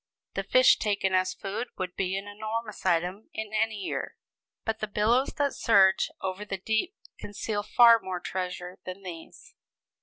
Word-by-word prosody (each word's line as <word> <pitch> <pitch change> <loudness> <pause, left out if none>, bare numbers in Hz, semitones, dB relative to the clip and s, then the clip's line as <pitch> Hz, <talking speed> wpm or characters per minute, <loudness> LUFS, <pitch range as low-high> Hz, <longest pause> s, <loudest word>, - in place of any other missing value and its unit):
The - - -1
fish - - +5
taken 200 -3 0
as 185 0 +1
food 210 +4 -4
would 180 -1 -4
be 190 0 -1
an 195 +1 -6
enormous 215 0 -5
item 180 +4 0
in 220 -1 -5
any 220 0 +1
year: 200 - -4 0.5
but 225 0 -1
the 215 - -2
billows 225 +6 +2
that 285 -1 +1
surge 195 -4 +4
over 190 +1 -3
the 200 -2 -4
deep 220 - -1 0.2
conceal 205 +1 -3
far 230 +2 +6
more 185 -3 -4
treasure 180 0 -5
than 185 +2 -8
these. 185 - -10
205 Hz, 160 wpm, -28 LUFS, 185-220 Hz, 0.5 s, far